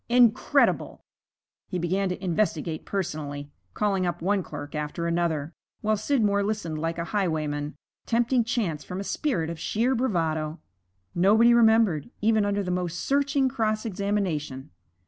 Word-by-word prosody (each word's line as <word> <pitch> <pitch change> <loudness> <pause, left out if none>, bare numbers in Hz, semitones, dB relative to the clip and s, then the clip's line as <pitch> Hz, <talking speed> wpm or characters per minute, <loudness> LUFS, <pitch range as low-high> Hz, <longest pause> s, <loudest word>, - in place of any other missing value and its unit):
Incredible! 240 -2 +3 0.6
He 185 - -3
began 185 +3 0
to 180 +1 -5
investigate 165 -3 -1
personally, 145 -6 -4 0.2
calling 195 -3 +1
up 175 - -2
one 195 +3 +1
clerk 145 -4 -8
after 150 +2 -3
another, 165 -2 -1 0.3
while 215 0 +2
Scidmore 210 -3 +1
listened 200 -7 -2
like 165 +1 -2
a 170 - -1
highwayman, 155 -6 -1 0.3
tempting 240 +1 +2
chance 205 -10 -1
from 180 0 -6
a - - -3
spirit 190 - -1
of 165 - -7
sheer 235 +9 +1
bravado. 165 -10 -1 0.5
Nobody 220 +7 +5
remembered, 220 -9 +4
even 215 -1 +3
under 205 0 0
the 180 - -2
most 180 -1 -2
searching 280 0 +2
cross 220 -3 -1
examination. 185 - -2
190 Hz, 140 wpm, -26 LUFS, 160-215 Hz, 0.6 s, Nobody